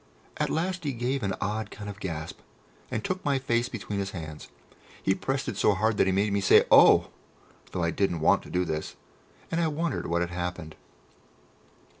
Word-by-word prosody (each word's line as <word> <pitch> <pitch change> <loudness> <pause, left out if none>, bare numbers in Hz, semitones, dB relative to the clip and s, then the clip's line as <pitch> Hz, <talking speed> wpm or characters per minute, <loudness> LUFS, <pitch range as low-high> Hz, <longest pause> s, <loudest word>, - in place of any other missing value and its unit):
At - - 0
last 180 +2 -1
he 145 -3 -1
gave 125 +3 -1
an 95 -3 -1
odd 105 +1 -2
kind 105 - -9
of 100 0 -7
gasp, 80 -5 -5 0.5
and 110 - -3
took 185 0 -3
my 140 -2 +2
face 120 -2 0
between 105 -3 -4
his 100 0 -2
hands. 80 -2 -8 0.6
He 95 - +3
pressed 135 +6 -2
it - - -3
so 105 - +3
hard 110 +2 +1
that - - +3
he - - +3
made 100 +2 +1
me 100 - +1
say - - +6
"O!" - - +7 0.6
though 90 - -2
I 85 - +1
didn't 90 -3 0
want - - +4
to - - -13
do 90 0 0
this, 80 -2 -4 0.6
and 165 +1 +1
I 165 - +2
wondered 160 0 -2
what 85 +1 0
had 85 0 -2
happened. 90 -2 -4
100 Hz, 200 wpm, -27 LUFS, 90-130 Hz, 0.6 s, O